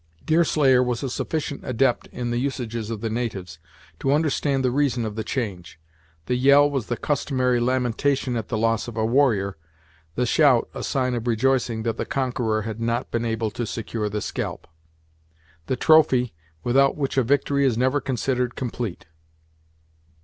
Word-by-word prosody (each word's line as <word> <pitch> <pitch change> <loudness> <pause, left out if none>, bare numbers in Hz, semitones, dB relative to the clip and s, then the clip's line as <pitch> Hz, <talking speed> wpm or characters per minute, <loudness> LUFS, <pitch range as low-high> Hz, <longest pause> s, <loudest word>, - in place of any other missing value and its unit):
Deerslayer 150 -5 +4
was 125 -1 -1
a 135 - -2
sufficient 145 0 -3
adept 130 0 +1
in 120 -1 -4
the 120 - 0
usages 120 -5 -3
of 110 -2 -4
the 115 - -2
natives 95 -8 -4 0.4
to 135 - 0
understand 145 -3 +1
the 125 - +2
reason 130 -3 +1
of 110 - -4
the 110 - -3
change. 95 - -4 0.5
The 125 - -1
yell 140 +3 +5
was 135 -6 -3
the 120 - -2
customary 130 -4 0
lamentation 130 +1 0
at 115 -2 -3
the 110 - -2
loss 115 +1 +1
of 120 -2 -8
a 110 - +1
warrior, 110 - +2 0.6
the 125 - +1
shout 130 -1 +4
a - - -6
sign 130 -2 0
of 120 0 -3
rejoicing 120 -1 +1
that 115 -1 -2
the - - -2
conqueror 120 -5 -1
had 110 +1 -5
not 115 +1 -1
been 115 0 -1
able 110 -1 -1
to 120 - -3
secure 110 -1 -3
the 105 +1 -3
scalp; - - -4 1.0
the 130 - 0
trophy, 130 -4 +4 0.3
without 135 +3 +3
which 140 -2 -2
a 135 - +4
victory 140 +2 +1
is 130 -5 +2
never 130 +4 +1
considered 125 -1 -1
complete. 120 -6 -4
125 Hz, 170 wpm, -24 LUFS, 115-135 Hz, 1.0 s, yell